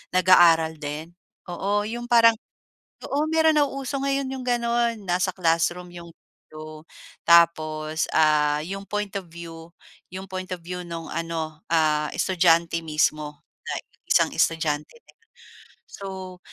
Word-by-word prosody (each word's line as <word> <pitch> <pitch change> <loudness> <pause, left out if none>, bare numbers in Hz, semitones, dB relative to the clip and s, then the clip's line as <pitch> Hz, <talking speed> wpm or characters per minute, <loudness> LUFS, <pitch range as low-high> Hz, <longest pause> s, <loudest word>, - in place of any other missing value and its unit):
nag-aaral 165 -3 +5
din. 150 +2 -6 0.4
Oo, 200 +4 -1
yung 240 +3 -5
parang 230 -2 +5 0.6
oo 290 +2 -1
mayro'n 320 -1 +3
nauuso 275 -1 -1
ngayon 275 0 -1
yung 260 -1 -6
gano'n 235 -1 +1
nasa 185 0 -1
classroom 175 0 0
yung 170 -1 -11
video, 155 0 -13 0.4
tapos, 155 -2 +3
ah, 150 -1 +3
yung 195 +4 -6
point 210 0 -3
of 190 - -10
view 165 0 -11 0.3
yung 190 +1 -9
point 185 0 -5
of 175 - -12
view 180 +1 -6
no'ng 165 -1 -7
ano, 165 -2 -4
ah, 155 -2 +2
estudyante 170 -2 +2
mismo, 155 -2 -1 0.2
na - - -3 0.3
isang - - +3
estudyante. 160 - -1 0.9
So, 190 -2 -8
175 Hz, 125 wpm, -24 LUFS, 160-205 Hz, 0.9 s, nag-aaral